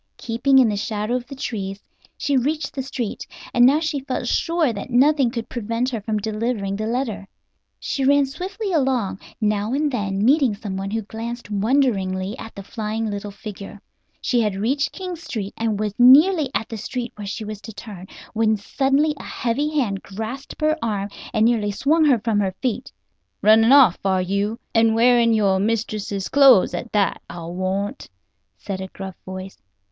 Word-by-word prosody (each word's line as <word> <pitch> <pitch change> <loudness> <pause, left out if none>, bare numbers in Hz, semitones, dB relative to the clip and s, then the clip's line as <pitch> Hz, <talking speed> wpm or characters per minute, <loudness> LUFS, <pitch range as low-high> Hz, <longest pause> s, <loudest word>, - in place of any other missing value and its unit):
Keeping 245 +4 +2
in 260 -3 +6
the 210 - -1
shadow 210 +2 -2
of 250 -1 -2
the 275 - -8
trees 200 -6 -4 0.4
she 290 -2 0
reached 295 +5 0
the 270 - -3
street, 255 -4 -5 0.3
and 245 0 +6
now 285 +4 +4
she 310 -3 -1
felt 265 -2 -4
sure 330 -2 +1
that 205 - -6
nothing 270 +1 +4
could 230 -1 -5
prevent 235 +2 -2
her 230 -4 -3
from 215 +1 -2
delivering 215 -1 -2
the 215 +2 -3
letter. 225 -5 -2 0.5
She 275 - -2
ran 280 +1 +4
swiftly 380 +8 -5
along, 260 - 0 0.2
now 210 +1 0
and 295 +1 +1
then 200 -4 -1
meeting 265 -4 +4
someone 195 -2 -5
who 225 +1 -2
glanced 230 +2 -7
wonderingly 205 -4 +1
at 225 - -9
the 200 - -8
flying 220 +1 -3
little 205 0 -5
figure. 200 0 -9 0.4
She 245 -2 +1
had 210 -3 0
reached 265 +9 0
King 365 -2 -5
Street 220 - -5
and 220 -2 -1
was 210 -2 -1
nearly 295 +5 +7
at 225 - -1
the 225 - -6
street 245 +3 -4
where 210 -1 -8
she 215 +2 -5
was 210 -1 -7
to 225 - -9
turn, 200 -3 -10 0.3
when 220 -1 +2
suddenly 275 +8 +1
a - - -8
heavy 255 +5 -1
hand 200 -7 -1
grasped 220 +7 -7
her 310 +1 +2
arm 205 -3 -2 0.2
and 220 -2 +2
nearly 225 -3 +2
swung 300 +10 +2
her 275 -5 +5
from 220 -1 0
her 190 -2 -1
feet. 255 -1 -2 0.5
"Running 220 +3 +6
off, 265 -10 +7
are 190 -1 +2
you? 200 +4 -1 0.2
And 225 -1 +4
wearing 235 0 +4
your 195 -3 +2
mistress's 210 -2 -2
clothes 270 -8 +6
at 240 - -5
that, 205 -2 +1
I'll 170 0 -7
warrant," 190 - -3 0.5
said 190 -1 -5
a 190 - -5
gruff 190 -1 -8
voice. 190 0 -8
225 Hz, 180 wpm, -22 LUFS, 205-265 Hz, 0.5 s, nearly